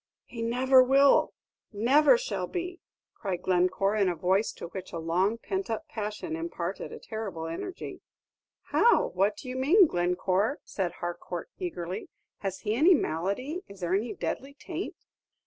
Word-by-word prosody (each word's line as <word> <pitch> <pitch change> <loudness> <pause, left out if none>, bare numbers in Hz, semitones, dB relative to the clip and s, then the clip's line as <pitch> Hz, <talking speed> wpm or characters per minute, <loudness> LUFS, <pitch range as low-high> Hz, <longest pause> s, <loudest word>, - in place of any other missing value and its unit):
"He 235 - -8
never 255 +3 +5
will 275 +2 +5 0.4
never 275 - +5
shall - - -3
be," 360 0 -4 0.3
cried 190 -4 -4
Glencore, 185 +3 +2
in 200 -3 +3
a 175 - -1
voice 190 +5 +1
to - - -8
which 190 0 -7
a - - -4
long 180 +7 +1
pent 380 +10 -3
up 230 +8 -3
passion 210 - -4
imparted 170 +3 -4
a - - -7
terrible 205 -7 -5
energy. 165 - -6 0.7
"How! 475 - +4
what 200 +3 +1
do 255 - -9
you 255 - -4
mean, 320 +10 +6
Glencore?" 185 - +1
said 180 -3 -3
Harcourt, 175 - -5
eagerly. 185 - -4 0.3
"Has 195 -2 -4
he 210 -1 -1
any 320 +10 +6
malady; 200 - -2
is 200 -1 -13
there 175 +1 -1
any 215 +5 0
deadly 280 +1 -4
taint?" 345 +5 -5
210 Hz, 155 wpm, -28 LUFS, 180-280 Hz, 0.7 s, mean